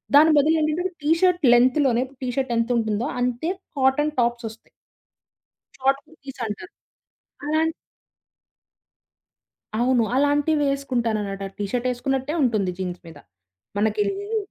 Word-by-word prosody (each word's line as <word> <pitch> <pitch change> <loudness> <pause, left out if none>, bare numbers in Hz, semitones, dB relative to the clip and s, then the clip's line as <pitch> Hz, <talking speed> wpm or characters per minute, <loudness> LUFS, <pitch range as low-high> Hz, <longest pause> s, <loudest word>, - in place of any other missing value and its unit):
దాని 310 +2 +7
బదులు 305 +3 +4
ఏంటంటే 345 +5 -1
టీ 300 - +2
షర్ట్ 360 -2 +3
లెంగ్త్‌లోనే 255 0 +3 0.2
టీ - - -2
షర్ట్ 260 -2 0
ఎంత 230 +1 0
ఉంటుందో 220 0 -1 0.2
అంతే 250 +7 -1 0.3
కాటన్ 270 +3 +2
టాప్సొస్తయి. 235 -1 -3 1.1
షార్ట్ 270 +1 +1
కుర్తీస్ 275 -6 -12
అంటారు. 280 - -7 0.7
అలాంటి 315 +2 +1 2.1
అవును. 245 -1 +3
అలాంటివేసుకుంటానన్నమాట. 275 -8 0
అది 195 - -16
టీ 205 - -1
షర్ట్ 250 0 -1
ఎసుకున్నట్టే 270 +3 -2
ఉంటుంది 215 -7 +1
జీన్స్ 180 -2 -4
మీద. 165 - -11 0.6
మనకి 210 0 +1
లేదు 405 +3 -4
265 Hz, 115 wpm, -23 LUFS, 230-300 Hz, 2.1 s, దాని